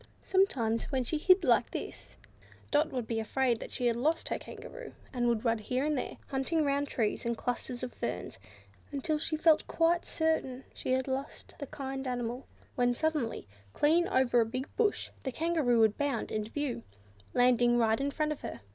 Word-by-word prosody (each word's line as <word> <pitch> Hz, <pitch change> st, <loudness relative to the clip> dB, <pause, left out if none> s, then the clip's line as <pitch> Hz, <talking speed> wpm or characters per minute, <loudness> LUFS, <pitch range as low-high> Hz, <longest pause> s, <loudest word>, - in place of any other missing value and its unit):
Sometimes, 245 Hz, -, +2 dB
when 265 Hz, -3 st, -1 dB
she 305 Hz, +5 st, -1 dB
hid 370 Hz, +3 st, +5 dB
like 245 Hz, -6 st, +4 dB
this, -, -, -7 dB, 0.6 s
little 295 Hz, +1 st, +5 dB
Dot -, -, -16 dB
would 250 Hz, -3 st, -2 dB
be 225 Hz, 0 st, -2 dB
afraid 240 Hz, +1 st, +1 dB
that -, -, -7 dB
she 250 Hz, -, -2 dB
had 235 Hz, -1 st, +3 dB
lost 310 Hz, +7 st, 0 dB
her -, -, -1 dB
Kangaroo, -, -, -9 dB, 0.2 s
and 240 Hz, -2 st, +1 dB
would 235 Hz, 0 st, +1 dB
run 230 Hz, -1 st, +2 dB
here 255 Hz, +6 st, -1 dB
and 305 Hz, 0 st, +1 dB
there, 255 Hz, -, -3 dB
hunting 280 Hz, +4 st, +1 dB
round 285 Hz, 0 st, +1 dB
trees, 225 Hz, -6 st, -1 dB
and 235 Hz, -1 st, -1 dB
clusters 245 Hz, +1 st, -3 dB
of 250 Hz, -, -4 dB
ferns, 90 Hz, +2 st, -4 dB, 0.5 s
until 295 Hz, +2 st, -1 dB
she 310 Hz, +1 st, 0 dB
felt 315 Hz, 0 st, +4 dB
quite 335 Hz, +1 st, +2 dB
certain 315 Hz, -5 st, 0 dB
she -, -, -4 dB
had 260 Hz, +1 st, 0 dB
lost 270 Hz, +2 st, -4 dB
the 285 Hz, -, -5 dB
kind 270 Hz, -1 st, -5 dB
animal; 245 Hz, +1 st, -3 dB, 0.3 s
when 245 Hz, -1 st, +2 dB
suddenly, 300 Hz, -, -1 dB, 0.3 s
clean 330 Hz, +4 st, +3 dB
over 245 Hz, -2 st, +3 dB
a -, -, +2 dB
big 255 Hz, +5 st, -4 dB
bush, 430 Hz, -2 st, +1 dB
the 265 Hz, -, -3 dB
Kangaroo 310 Hz, -6 st, +2 dB
would 220 Hz, -2 st, +4 dB
bound 280 Hz, -6 st, -1 dB
into 215 Hz, 0 st, -2 dB
view, 290 Hz, -1 st, -2 dB, 0.5 s
landing 245 Hz, -1 st, +4 dB
right 225 Hz, 0 st, +3 dB
in 280 Hz, -, +1 dB
front 305 Hz, +1 st, -1 dB
of 300 Hz, -, -4 dB
her. -, -, -6 dB
260 Hz, 190 wpm, -31 LUFS, 240-300 Hz, 0.6 s, hid